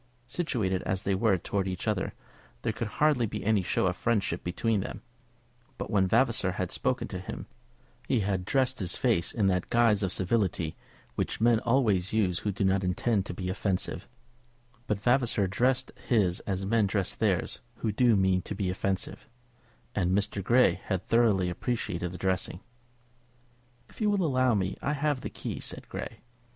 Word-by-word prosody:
Situated 110 - -1
as 95 0 -2
they 100 - +1
were 100 0 +3
towards 95 +2 -2
each 95 +4 -5
other 105 -3 -1 0.5
there - - 0
could 115 - -3
hardly 135 0 +2
be - - -5
any 105 -2 +3
show 90 - 0
of 90 -1 +1
friendship 110 -1 0
between 105 +5 0
them; 95 - -6 0.7
but - - -5
when 95 -3 +3
Vavasor 115 -4 +2
had 90 0 -3
spoken 125 -2 -1
to 95 - -4
him, 95 - -7 0.6
he 125 -5 +2
had 95 -2 -1
dressed 130 +4 +1
his 90 -4 0
face 85 0 +1
in 105 - 0
that 90 -2 +1
guise 115 -3 +4
of 95 -3 0
civility 95 -5 0 0.4
which - - -2
men 115 0 +4
always 110 -7 +2
use 95 -6 +2
who 105 - -1
do 100 - -2
not 95 0 +2
intend 95 +3 0
to - - -4
be 90 +1 -4
offensive; 95 0 -2 0.8
but 105 -2 0
Vavasor 120 -2 +2
dressed 125 +7 +1 0.2
his 100 -7 +2
as 95 -1 -1
men 110 0 +3
dress 95 -1 0
theirs - - 0
who 110 - -2
do 120 +1 +4
mean 95 -1 +3
to 105 - -6
be 95 -2 -1
offensive; 95 +2 -3 0.6
and 95 -1 +1
Mr. 100 -1 -1
Grey 125 +6 +4
had 95 -2 -1
thoroughly 110 -6 +3
appreciated 90 -3 -2
the 90 - -7
dressing. 95 -1 -1 1.3
"If - - -15
you 210 - +3
will 200 -3 +2
allow 130 -5 +3
me, 95 -1 -1
I 145 - 0
have 145 -2 0
the - - -4
key," - - -5
said - - -6
Grey. - - -6
100 Hz, 175 wpm, -29 LUFS, 95-120 Hz, 1.3 s, guise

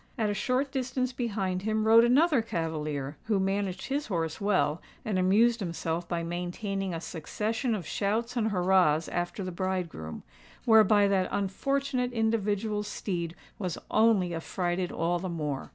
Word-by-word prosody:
At 215 -3 +1
a - - 0
short 255 +6 0
distance 255 -1 -1
behind 200 -7 -2
him 215 +1 0
rode 225 +1 +7
another 275 +3 +4
cavalier, 155 -8 -3
who 215 -3 +1
managed 195 -1 -1
his 285 +2 -2
horse 165 -3 -2
well, 185 -6 +1 0.2
and 205 -4 0
amused 225 +6 +4
himself 170 -2 -3
by 170 -1 -1
maintaining 180 +3 -3
a 165 - -3
succession 215 - -2
of 185 -6 -5
shouts 225 +4 -1
and 225 -3 +1
hurrahs 180 -5 +3
after 175 +3 -2
the 185 - -4
bridegroom, 175 - -3 0.4
whereby 215 -2 +6
that 190 -2 +1
unfortunate 250 +6 -1
individual's 215 -2 0
steed 175 -5 -3 0.2
was 180 -4 -3
only 215 -6 +3
affrighted 175 +2 -2
all 170 +1 0
the 185 +1 -4
more. 150 -5 -3
195 Hz, 150 wpm, -29 LUFS, 175-225 Hz, 0.4 s, rode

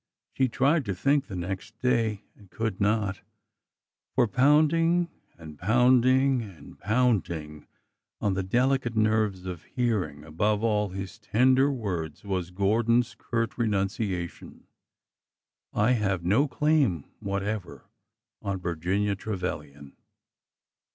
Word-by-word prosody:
She 130 - +2
tried 140 +6 +2
to 100 -3 -2
think 140 +8 +1
the 95 - -7
next 95 +4 -5
day 115 -5 0
and 100 -3 -19
could 110 -2 -3
not— 105 -1 +1 0.9
for - - +4
pound 145 +7 +4
ing 170 +1 +2 0.3
and 80 -3 -11
pounding 130 +4 +4
and 90 -10 -12
pounding 95 -10 0 0.5
on 100 - 0
the 95 - -1
delicate 125 +4 +1
nerves 110 -3 +1
of 90 -3 -5
hearing, 110 - -2
above 105 +7 0
all 105 -2 +1
his 95 +3 -7
tender 130 +6 +3
words, 90 - -4
was 95 -3 -2
Gordon's 115 +6 +1
curt 115 0 -3
renunciation,— 100 -4 -2 1.1
I 105 +4 +2
have 100 -7 0
no 115 +11 +3
claim 140 - +1 0.2
whatever 100 0 -4 0.6
on 100 -1 -3
Virginia 90 +4 -1
Trevilian." 75 -9 -5
105 Hz, 115 wpm, -27 LUFS, 95-125 Hz, 1.1 s, for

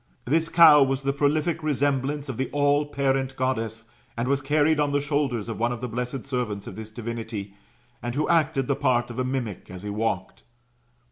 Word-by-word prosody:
This 160 +5 +1
cow 160 -4 +8
was 135 0 +1
the 140 0 +1
prolific 155 +4 +1
resemblance 145 -1 0
oi 135 - -3
the 130 +3 -2
alKparent 140 -2 +1
Goddess, 115 -4 -2 0.3
and 120 +2 -1
was 140 +1 +1
carried 150 +2 +2
on 145 -1 +2
the 145 - +3
shoulders 140 -6 -1
of 115 - -5
one 120 +1 +1
of 120 - -4
the 125 - -4
blessed 125 +2 -4
servants 120 -7 -3
of - - -8
this 110 0 -7
divinity, 110 -3 -6 0.5
and 120 0 -4
who 150 - 0
acted 155 -5 +2
the 140 - 0
part 130 -4 +1
of 120 - -6
a - - +1
mimic 125 -7 -4
as 90 +1 -9
he 105 - -4
walked. 105 -3 -2
135 Hz, 195 wpm, -25 LUFS, 115-145 Hz, 0.5 s, cow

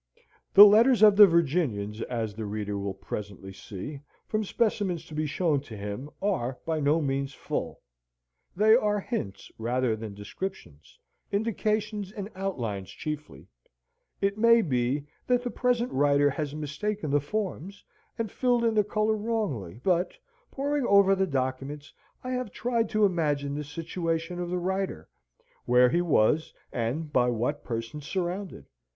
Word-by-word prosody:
The 205 - +13
letters 225 +3 +6
of 210 -2 +8
the 205 0 +10
Virginians, 135 - 0
as 115 -4 -3
the 110 0 -5
reader 105 0 -3
will 100 -1 -3
presently 95 0 -7
see, 105 +9 -8 0.3
from 215 0 -1
specimens 200 -6 -1
to 160 - -12
be 155 0 -1
shown 155 -1 +1
to 115 -6 -10
him, 105 +7 -5
are 130 -11 -1
by 160 -1 -1
no 150 +2 +3
means 135 0 -2
full. - - -4 0.7
They 215 +4 +6
are 210 -3 +2
hints 100 - -5
rather 120 0 0
than 110 -2 -7
descriptions 100 - -8 0.3
indications 210 -1 -1
and 205 0 -7
outlines 115 - -4
chiefly: 150 -1 -7 0.7
it 200 +1 0
may 230 0 +6
be, 130 0 0 0.2
that 245 -1 +2
the 245 - -3
present 245 -1 0
writer 145 +1 +3
has 150 0 -4
mistaken 155 +4 -3
the 145 - +4
forms, 195 +2 -4 0.3
and 225 -3 -3
filled 245 -2 +1
in 230 -1 +2
the 210 -1 +3
colour 215 +1 0
wrongly: 200 - -3
but, 180 -1 +1 0.3
poring 285 -1 -1
over 200 -1 +6
the 190 0 +1
documents, 135 +1 -3 0.3
I 255 - -4
have 250 -3 -2
tried 235 0 -1
to 215 -1 +3
imagine 145 -6 0
the 150 +1 -3
situation 165 +3 -3
of 175 -1 -3
the 180 - -1
writer, 190 - -3 0.6
where 125 +1 +5
he 175 - +2
was, 155 -2 +2 0.2
and 135 +6 -2
by 125 -1 +3
what 120 +5 -1
persons 120 +6 -5
surrounded. 185 - -3
160 Hz, 150 wpm, -27 LUFS, 125-205 Hz, 0.7 s, The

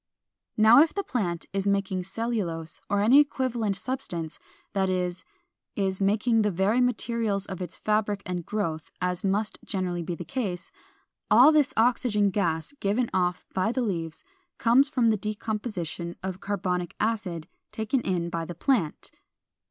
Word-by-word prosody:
452. 215 - +2
Now 235 +6 +9
if 325 - -2
the 400 - -1
plant 180 - -2
is 195 0 -1
making 195 -2 0
cellulose 180 -6 -3
or 205 0 +2
any 240 +7 +7
equivalent 250 -8 +1
substance, 180 - -4 0.3
that 190 -1 +1
is, 180 -1 -2 0.5
is 190 -1 -1
making 220 +3 +3
the 210 - +2
very 200 +6 +2
materials 230 -4 0
of 190 -2 -6
its 175 -2 -6
fabric 210 -1 0
and 180 -1 -3
growth, 165 -6 -3
as 180 -1 -2
must 205 +2 -1
generally 180 -3 -2
be 170 +1 -4
the - - -7
case, 205 -10 -4 0.6
all 245 +8 +8
this 300 -3 +3
oxygen 220 -3 +3
gas 170 - -1
given 220 +5 0
off 180 -1 0
by 190 +4 +1
the 255 +1 -1
leaves 165 -7 -3 0.3
comes 255 +5 +5
from 245 -6 +3
the 215 - +1
decomposition 210 -5 -4
of 190 -1 -4
carbonic 180 -3 -2
acid 205 -7 -2 0.2
taken 220 +4 -1
in 175 -4 -1
by 165 -1 -2
the 175 +1 -7
plant. 195 - 0
200 Hz, 155 wpm, -27 LUFS, 180-230 Hz, 0.6 s, Now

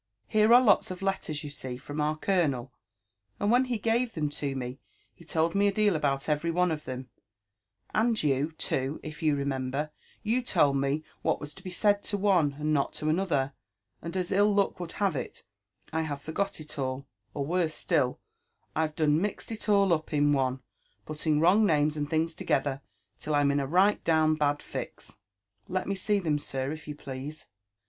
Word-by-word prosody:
*' - - -56
Here 215 +1 +4
are 245 +2 +8
lots 205 -5 +4
of 185 +1 -6
letters, 165 -6 -2
you 145 - -6
see, 130 -3 -6
from 145 +3 -5
our 155 +1 0
colonel: 150 -9 0 0.7
and 205 +1 +2
when 250 +2 +4
he 250 -2 -1
gave 230 +2 0
them 150 -3 0
to 140 -2 -3
me, 125 0 -5 0.3
he - - -17
told 165 0 0
me 200 +1 +3
a - - +3
deal 205 -2 +2
about 140 -3 0
every 150 +2 0
one 180 +1 +2
of 150 -1 -4
them; 130 0 -6 0.4
— 100 -2 -36
and 225 -2 +2
you, 145 +1 +1
too, 135 -2 -2
if 155 0 -8
you 155 -2 +3
remember 140 +1 -2 0.2
— - - -31
you 250 +2 +3
told 145 - +2
me 140 +3 0 0.2
what - - +1
was 145 0 -5
to - - -14
be 185 - -5
said 205 +2 +2
to 205 - 0
one, 185 -8 +3
and 155 +1 0
not 140 -2 +1
to 155 - -2
another; 155 -6 +1 0.5
and, 170 +3 -5
as 180 0 -2
ill 205 +2 +4
luck 200 -2 +1
would 175 -2 -6
have 195 -6 0
it, 130 - -5 0.5
I 160 - +1
have 145 -3 -3
forgot 195 +4 -2
it 155 -1 -9
all,— 130 0 -2 0.3
or, 140 - -1
worse 165 0 0
still, 140 -7 +1 0.6
I've 155 -1 0
gone 155 -2 +2
done 155 - +2
mixed 210 +3 -3
it 215 -1 -5
all 200 -3 +5
up 155 -1 -2
in 145 0 +3
one, 130 -1 0 0.4
putting 155 0 0
wrong 180 +7 +5
names 155 -5 +3
and 145 -1 -3
things 160 +1 0
together 140 -2 -1 0.4
till 150 - -1
Tm 145 -1 +3
in 140 - +1
a 135 - -1
right 190 +7 +3
down 160 -1 +3
bad 145 -1 0
fix." - - -7 0.5
Let 185 0 -2
me 200 - 0
see 200 +2 +1
them, 155 -6 0
sir, 135 -1 -3
if 155 -1 -8
you 150 - -5
please. 140 +2 -7
155 Hz, 205 wpm, -28 LUFS, 140-190 Hz, 0.7 s, are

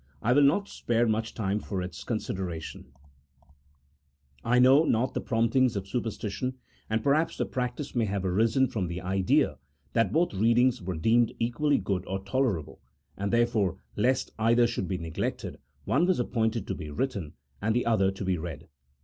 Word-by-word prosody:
I 120 - +3
will 145 - +5
not 165 +9 +3
spare 120 - 0
much 110 0 -1
time 105 -1 -1
for 100 -2 -4
its 90 0 -6
consideration: 95 -7 -4 1.6
I 125 +1 +2
know 130 +5 +6
:not 125 -4 +1
the - - -2
promptings 115 +1 +2
of 100 -1 -3
superstition, 120 +2 -3 0.3
and 110 0 0
perhaps 150 +4 +2
the - - 0
prac 125 -1 -2
tice 145 - -6
may 120 -2 +1
have 100 -2 -2
arisen 115 +8 +2
from 100 -6 -2
the 85 +1 -4
idea 95 -6 +1 0.3
that 115 -4 +2
both 170 +2 +1
readings 120 +4 +3
were 90 -2 -4
deemed 115 +7 +3
equally 130 +5 +1
good 95 -2 -2
or 95 - -2
tolerable, 100 - -1 0.3
and 100 +1 -3
therefore, 115 -6 +2 0.2
lest 130 +5 +1
either 115 +2 +4
should 115 -5 -2
be 95 - -2
neglected, 80 -1 -4 0.3
one 160 +7 +2
was 185 -5 +2
appointed 115 -3 0
to - - -3
be 80 -4 -7
written, 95 - -3 0.3
and 110 +2 +1
the 120 - +1
other 105 -5 +3
to 95 +1 -5
be 90 -2 0
read. 80 -1 -7
115 Hz, 175 wpm, -28 LUFS, 95-125 Hz, 1.6 s, know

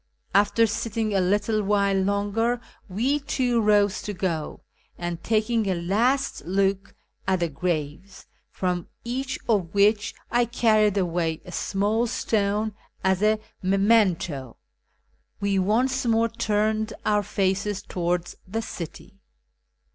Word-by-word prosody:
After 205 +3 +4
sitting 220 0 -2
a 195 - +3
little 205 +4 +1
while 200 -1 +2
longer 205 +5 +1 0.3
we 250 +10 +1
too 255 -4 0
rose 205 -1 +3
to 210 - -4
go, 170 -5 -3 0.4
and, 175 -1 -4
taking 220 -1 +1
a 185 - +1
last 230 - 0
look 195 +3 0 0.3
at 185 -2 +1
the 170 - +1
graves, 170 +3 -4 0.2
from 180 -2 -2 0.2
each 260 +3 -3
of 200 -6 0
which 205 +1 +3 0.2
I 240 0 +3
carried 215 -3 +3
away 170 -3 0
a 180 - -9
small 210 +6 0
stone 215 -1 0 0.3
as 190 0 +2
a 215 +1 +4 0.2
memento, 190 - +2 0.8
we 200 -1 +1
once 250 +7 +1
more 230 0 +3
turned 220 -1 0
our 210 -1 +3
faces 195 +1 -1
towards 175 -1 -2
the 225 +4 -3
city. 190 +2 -8
205 Hz, 125 wpm, -25 LUFS, 185-225 Hz, 0.8 s, After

